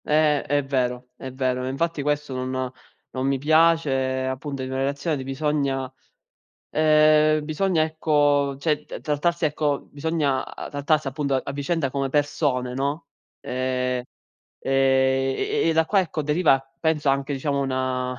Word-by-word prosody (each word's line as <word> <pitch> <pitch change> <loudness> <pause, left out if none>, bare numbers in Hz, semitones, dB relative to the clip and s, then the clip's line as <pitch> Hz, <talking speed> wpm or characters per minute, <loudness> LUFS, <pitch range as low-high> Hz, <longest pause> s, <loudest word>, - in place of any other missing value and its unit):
Eh, 150 -1 +3
è 145 +1 0
vero, 125 -2 -1
è 130 - -8
vero. 130 -1 -1
Infatti, 155 +4 -1
questo 145 -1 -1
non 130 0 -3 0.4
non 130 +1 -1
mi 135 0 +1
piace, 145 -4 +2
appunto, 135 +1 -4
in 130 - -5
una 130 - -2
relazione 140 +3 -1
di 135 - -5
bisogna 135 -1 -1 0.8
ehm, 155 0 +4
bisogna, 160 +2 +1
ecco, 145 -3 +2
cioè, 150 +1 0
t - - -8
trattarsi 165 +3 0
ecco, 145 -1 -1
bisogna 145 -3 -1 0.3
trattarsi, 145 +1 0
appunto, 140 +1 -2
a 130 - +2
a - - -4
vicenda 145 +1 -1
come 135 0 -2
persone, 145 -3 0
no, 140 +3 -2 0.3
ehm, 125 0 -1 0.6
e - - -4 0.7
e - - -2 0.2
e - - +3
e - - +3
da 160 0 +4
qua, 195 +4 +3
ecco, 160 -4 -3
deriva, 150 -1 +3 0.2
penso, 155 -3 +1
anche, 140 +1 -1
diciamo, 140 +1 -1
una 130 -1 -2
140 Hz, 150 wpm, -24 LUFS, 130-155 Hz, 0.8 s, ehm